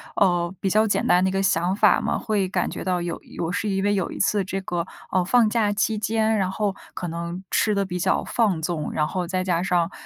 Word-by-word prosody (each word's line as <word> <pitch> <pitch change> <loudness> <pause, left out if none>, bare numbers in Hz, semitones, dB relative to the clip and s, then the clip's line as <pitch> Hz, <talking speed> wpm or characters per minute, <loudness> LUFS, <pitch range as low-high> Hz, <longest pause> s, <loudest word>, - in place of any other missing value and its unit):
呃， 175 -2 +2
比 195 - 0
较 215 +3 +3
简 - - 0
单 180 +1 +4
的 190 - +2
一 - - -3
个 195 0 0
想 180 0 +1
法 - - +4
嘛， - - -1
会 210 -4 0
感 185 - -1
觉 - - -6
到 180 -1 0
有 175 -1 -4 0.2
我 165 - -2
是 205 +3 -2
因 195 -1 0
为 205 0 +2
有 190 -3 -1
一 - - -7
次 205 -2 +1
这 195 +1 -3
个， 175 -2 -3 0.3
呃， 185 - +2
放 225 +4 +4
假 215 -2 +1
期 215 +1 0
间， 220 +1 +1
然 190 -2 0
后 205 0 -1 0.2
可 175 - -5
能 170 +3 -5
吃 210 -2 +2
得 200 0 +1
比 180 -1 -4
较 - - +1
放 200 -9 +1
纵， 160 -2 -2
然 150 -1 +1
后 180 +2 -3
再 185 0 -1
加 175 -2 0
上， 180 -2 +1
190 Hz, 270 characters per minute, -24 LUFS, 175-205 Hz, 0.3 s, 单